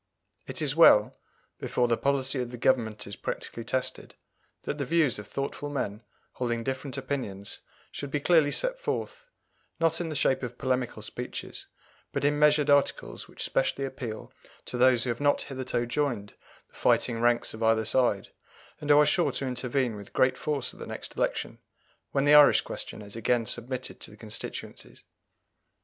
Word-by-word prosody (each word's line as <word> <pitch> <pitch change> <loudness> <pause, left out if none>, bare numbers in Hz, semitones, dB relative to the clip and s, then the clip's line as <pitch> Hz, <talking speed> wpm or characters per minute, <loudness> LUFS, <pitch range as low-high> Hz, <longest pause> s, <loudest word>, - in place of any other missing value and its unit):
It 130 +4 -1
is 145 -1 +1
well, 105 -10 +6 0.4
before 125 - 0
the 120 - +3
policy 135 0 0
of 125 - -4
the 125 - -8
Government 115 -4 +1
is 100 - -7
practically 115 - -5
tested, 130 +2 -3 0.5
that 150 - -4
the - - 0
views 150 -5 +2
of 105 - -9
thoughtful 140 +3 -4
men 110 -7 -3 0.3
holding 120 -2 -2
different 135 +2 -4
opinions 125 -8 -4 0.3
should 140 - -6
be 145 - -1
clearly 160 -1 +4
set - - -1
forth, - - -4 0.5
not 165 0 +2
in 165 - -3
the 155 - -4
shape 130 -2 +2
of 125 -1 -6
polemical 125 -4 -1
speeches, 125 +3 -6 0.4
but - - -1
in 145 0 +2
measured 150 -1 +4
articles 140 -1 +1
which - - -6
specially 135 - 0
appeal 125 -5 -6 0.3
to - - -6
those 125 -1 +4
who 120 - 0
have 120 - -5
not 145 0 +3
hitherto 130 -3 -3
joined 120 -5 -2 0.4
the - - -34
fighting 115 -1 +2
ranks 120 0 +2
of 110 - -9
either 110 0 +3
side, 120 -7 +1 0.5
and 150 - -6
who 145 - +7
are 150 - +7
sure 175 +3 +2
to 140 - -2
intervene 125 -1 -1
with 100 -1 -11
great 130 - +3
force 150 -2 -2
at - - -16
the - - -7
next - - -6
election, - - -2 0.5
when 140 0 +1
the 145 - +6
Irish 150 -1 +8
question 105 - -6
is 100 +1 -10
again 115 +1 +1
submitted 125 +3 -4
to - - -8
the - - -15
constituencies. - - -8
130 Hz, 175 wpm, -28 LUFS, 120-145 Hz, 0.5 s, Irish